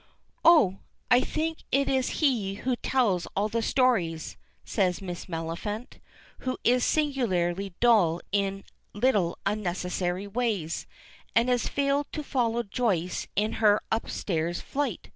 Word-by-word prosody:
"Oh! 250 - +6 0.3
I 245 - +8
think 320 +3 -2
it 275 +1 +2
is 265 -1 +1
he 225 -10 +1
who 250 +4 -1
tells 215 -11 +1
all 205 +2 +1
the 230 +1 -1
stories," 220 - +1 0.3
said 185 -4 +1
Miss 180 -3 -6
Maliphant, 170 +8 -5 0.4
who 255 0 -3
is 250 +1 +3
singularly 195 - 0
dull 205 -9 +4
in 195 0 0 0.3
little 205 -6 +1
unnecessary 185 -2 -1
ways, 205 -6 -2 0.5
and 235 +2 +4
has 245 -1 +1
failed 280 0 0
to 305 - -3
follow 235 -4 0
Joyce 195 -6 -1
in 215 +2 +1
her 210 -1 +5
upstairs 175 -6 -1
flight. 275 -9 -3
210 Hz, 125 wpm, -27 LUFS, 180-255 Hz, 0.5 s, I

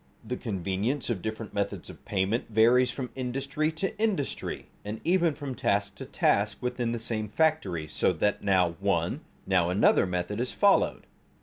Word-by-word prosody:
The 125 +3 -3
convenience 105 +5 -2
of 115 - 0
the - - -13
different 110 +1 -5
methods 100 -1 -2
of - - -12
payment 100 +4 0
varies 120 +3 +5
from 130 -3 -5
industry 135 +4 -1
to 175 +5 -2
industry, 205 -11 -1 0.2
and 105 +2 -5
even 170 -3 +2
from 140 -3 -5
task 100 -4 0
to - - -7
task 100 +1 +1
within 125 -1 -2
the 120 - -1
same 110 -2 -3
factory, 105 - 0
so 75 - +1
that 105 -1 0
now 95 -3 +3
one, - - 0 0.2
now 90 -3 +2
another 95 +1 +4
method 90 +4 -2
is 125 - -1
followed. 200 -1 +3
115 Hz, 170 wpm, -28 LUFS, 100-135 Hz, 0.2 s, varies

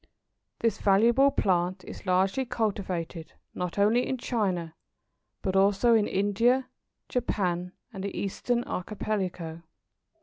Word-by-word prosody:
This 230 -1 +1
valuable 235 +7 +5
plant 185 -5 0
is - - -10
largely 190 +7 +2
cultivated 190 -9 -3 0.2
not 180 0 -4
only 220 +5 +3
in 260 - -1
China 185 -10 -1 0.7
but 190 -2 -1
also 200 +4 +4
in 215 -2 +4
India, 230 +7 +2 0.4
Japan, 180 -7 -1 0.2
and 195 -2 -6
the 200 - -4
Eastern 240 +5 -1
Archipelago. 180 -5 -3
200 Hz, 110 wpm, -28 LUFS, 180-230 Hz, 0.7 s, valuable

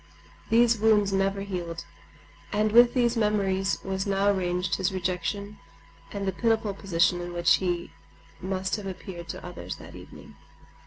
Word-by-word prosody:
These 230 0 +4
wounds 210 -2 +3
never 195 +1 +1
healed. 175 -4 -5 0.7
And 210 +1 +1
with 240 +2 +6
these 240 -1 +2
memories 200 -3 +1
was 190 +1 -2
now 200 +1 +2
ranged 180 -2 -1
his 190 0 0
rejection 190 +3 -3 0.5
and 200 -1 -4
the - - +2
pitiful 220 -1 0
position 175 -2 +1
in 175 0 -6
which 175 -1 +4
he 175 -2 -2 0.5
must 190 +1 -2
have 205 -2 -6
appeared 180 -2 -7
to - - -6
others 180 -1 -6
that - - -12
evening. - - -13
195 Hz, 150 wpm, -27 LUFS, 180-210 Hz, 0.7 s, with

